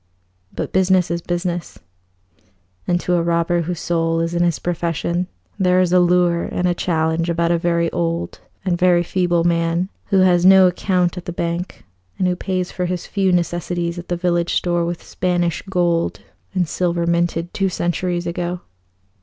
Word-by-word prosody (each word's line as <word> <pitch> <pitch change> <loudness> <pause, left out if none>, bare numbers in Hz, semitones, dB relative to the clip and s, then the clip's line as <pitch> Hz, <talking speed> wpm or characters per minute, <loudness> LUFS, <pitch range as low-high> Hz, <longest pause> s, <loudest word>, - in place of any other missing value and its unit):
But - - -5
business 185 -2 +3
is 170 0 -1
business, 175 0 -3 1.1
and 175 -1 +2
to 180 - -1
a 175 - +3
robber 170 +1 +1
whose 170 0 -4
soul 165 -1 0
is 165 +1 -1
in 175 - 0
his 170 -2 +2
profession, 170 +1 -2 0.3
there 185 -1 +3
is 180 -1 +2
a 180 - +6
lure 175 -1 +3
and 180 - -1
a 175 - +2
challenge 165 -1 0
about 170 0 +1
a 170 - +2
very 170 0 +1
old 170 0 -2 0.3
and 175 -2 0
very 180 -1 +4
feeble 175 -1 +1
man 170 +1 +1 0.2
who 195 -2 +3
has 180 -2 +4
no 190 0 +8
account 180 0 +1
at 175 - -13
the - - -4
bank, 170 +1 -4 0.3
and 185 - +1
who 180 - +1
pays 185 0 -2
for 180 -1 -2
his 180 -1 -3
few 195 -2 0
necessities 175 0 -1
at 175 - -9
the 175 - -2
village 175 -1 0
store 175 -1 +1
with 170 0 -4
Spanish 175 -2 -1
gold 175 -3 0 0.3
and 180 -2 +1
silver 170 +1 -1
minted 170 0 0
two 195 -1 0
centuries 175 0 -2
ago. 175 +1 -3
175 Hz, 175 wpm, -20 LUFS, 170-180 Hz, 1.1 s, no